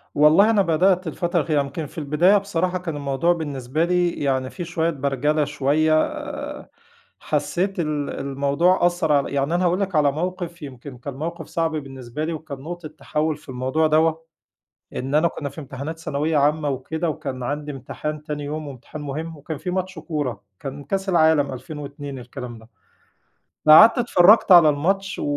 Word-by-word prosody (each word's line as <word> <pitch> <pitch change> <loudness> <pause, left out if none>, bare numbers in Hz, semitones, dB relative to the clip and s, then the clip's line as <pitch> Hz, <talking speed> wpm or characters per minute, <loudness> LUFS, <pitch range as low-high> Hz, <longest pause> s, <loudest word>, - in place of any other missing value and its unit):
والله، 155 +8 +6
أنا 215 -3 +4
بدأت 180 +1 +2
الفترة 175 +2 -1
الأخيرة، 155 -1 +1
يمكن 150 +3 -5
في 145 - -14
البداية 160 +7 +3
بصراحة 185 -2 -1
كان 175 -4 -5
الموضوع 145 +4 +1
بالنسبة 145 -2 -2
لي 175 0 +2
يعني 130 -4 -1
في 180 - -6
شويّة 165 0 0
برجلة 145 +1 0
شويّة، 145 +2 +1 1.3
حسّيت 195 +2 -1
ال 150 -3 -1
الموضوع 140 +7 +1
أثّر 175 -2 +1
عل 140 -1 +2
يعني 140 +4 0
أنا 180 +1 +1
هاقول 175 +2 +2
لك 195 -3 -2
على 145 -2 +4
موقف، 175 +2 -4
يمكن 135 -2 -9
كان 135 +3 -7
موقف 160 +3 -5
صعب 165 -1 -1
بالنسبة 135 -2 -6
لي، 165 - -2
وكان 155 -3 -7
نقطة 170 +3 -7
تحوّل 155 0 -2
في 150 - -18
الموضوع 130 +5 0
دوّة، 160 +1 +2 0.7
إن 135 +3 -2
أنا 155 +3 +4
كنّا 145 -3 -5
في 160 - -9
امتحانات 140 +4 -6
ثانوية 155 0 -1
عامةً 150 +1 +2
وكده، 160 +5 -2
وكان 130 -4 -5
عندي 145 +3 -3
امتحان 150 +3 -6
تاني 150 -1 -5
يوم، 150 +1 -5
وامتحان 140 +3 -9
مهم، 155 +3 -5
وكان 150 +2 -6
في 180 - -4
ماتش 185 -1 -3
كورة، 145 - -3 0.2
كان 140 +1 -7
كاس 195 +6 -2
العالم 160 -5 +3
2002 145 -1 -7
الكلام 125 -1 -8
ده، 110 - -17 1.0
فقعدت 215 - +9
اتفرّجت 210 -4 +5
على 170 -4 +9
الماتش 195 +7 0
و - - -3
155 Hz, 170 wpm, -22 LUFS, 140-170 Hz, 1.3 s, فقعدت